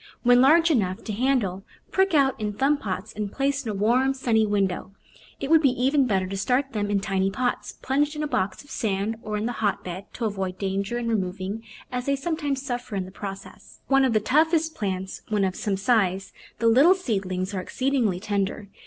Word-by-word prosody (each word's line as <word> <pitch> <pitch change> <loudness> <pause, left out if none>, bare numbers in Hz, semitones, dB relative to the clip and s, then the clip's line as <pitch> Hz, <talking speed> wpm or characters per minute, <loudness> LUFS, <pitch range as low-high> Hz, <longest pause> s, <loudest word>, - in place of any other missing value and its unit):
When 245 0 +6
large 325 +5 +5
enough 190 -9 0
to 215 - -4
handle, 220 -6 0 0.3
prick 380 -2 +2
out 270 -2 +4
in 210 -1 -2
thumb 275 +7 +2
pots 205 -3 -5
and 210 -2 -4
place 275 0 0
in 230 - -4
a 210 - -2
warm, 250 +7 +2
sunny 225 -4 +2
window. 195 -2 -1 0.5
It 275 - -3
would 320 -1 +7
be 280 - +5
even 265 +2 +2
better 190 -4 +1
to 195 +1 -5
start 260 +7 0
them 205 -2 -1
in 200 -1 +1
tiny 195 0 0
pots, 245 +5 -2
plunged 290 +3 +1
in 300 - -3
a - - -1
box 190 -5 -2
of 285 - -17
sand 210 0 -1
or 210 0 -3
in 210 - -2
the 240 - -1
hotbed, 195 -2 -2
to 235 - -3
avoid 190 -3 -3
danger 195 +4 -2
in 240 -1 -3
removing, 195 -1 -2 0.3
as 250 +1 -3
they 280 - +2
sometimes 285 -2 -2
suffer 245 -4 -4
in 190 -1 -2
the 185 - -11
process. 195 +1 -9
Though - - -1
one 270 0 +6
of 255 - +1
the 215 - +4
toughest 315 - +2
plants 190 -4 -4
when 210 -2 +1
of 190 -1 0
some 200 -2 -1
size, 195 -3 +1 0.2
the 230 - +1
little 275 +11 +6
seedlings 195 - -2
are 190 - -2
exceedingly 250 -5 0
tender. 200 0 -2
220 Hz, 210 wpm, -25 LUFS, 195-270 Hz, 0.5 s, would